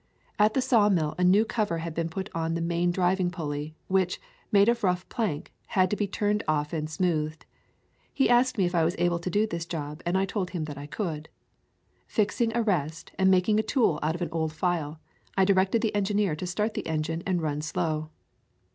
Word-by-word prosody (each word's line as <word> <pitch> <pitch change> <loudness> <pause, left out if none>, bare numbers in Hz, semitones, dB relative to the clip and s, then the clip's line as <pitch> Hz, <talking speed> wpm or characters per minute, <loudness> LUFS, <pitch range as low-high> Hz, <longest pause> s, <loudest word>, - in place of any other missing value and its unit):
At 210 +1 +4
the 265 - +2
sawmill 205 - +3
a - - +2
new 195 +5 +5
cover 215 -6 -1
had 165 0 -4
been 165 0 -2
put 190 +4 -4
on 165 0 -1
the - - -1
main 170 +1 +1
driving 180 0 +1
pulley, 150 -2 -4
which, 185 -1 +1 0.3
made 200 -1 +5
of 235 -1 +2
rough 180 -1 +1
plank, 200 -11 -3
had 185 -2 +2
to - - +2
be 205 -1 -1
turned 210 +1 0
off 150 0 0
and 155 -1 -2
smoothed. 155 -2 -1 0.7
He 270 - +2
asked 245 +1 +3
me 190 - +3
if 175 - -2
I 170 -2 +3
was 170 +3 +1
able 175 -1 +1
to 170 - -4
do 205 +4 +2
this 170 -5 -4
job 150 -2 -5
and 175 +2 +1
I 190 - +2
told 190 -2 -2
him 175 -4 -3
that 150 -2 -6
I 145 - -7
could. 160 -3 -4 0.8
Fixing 225 +2 +1
a 235 - +2
rest 160 -7 -1
and 190 0 +5
mak 185 -1 +4
ing 215 -1 +3
a - - +4
tool 220 - +1
out 155 +2 0
of 175 - -3
an 170 - -3
old 160 -1 -1
file, 160 -2 -1 0.4
I 190 - +5
directed 195 +3 +3
the 220 - +2
engi 205 0 0
neer 200 -6 +2
to 180 +4 -5
start 210 +5 -1
the - - -4
engine 160 +1 -2
and 185 -2 +1
run 150 -2 -2
slow. 155 0 -2
175 Hz, 220 wpm, -27 LUFS, 160-205 Hz, 0.8 s, new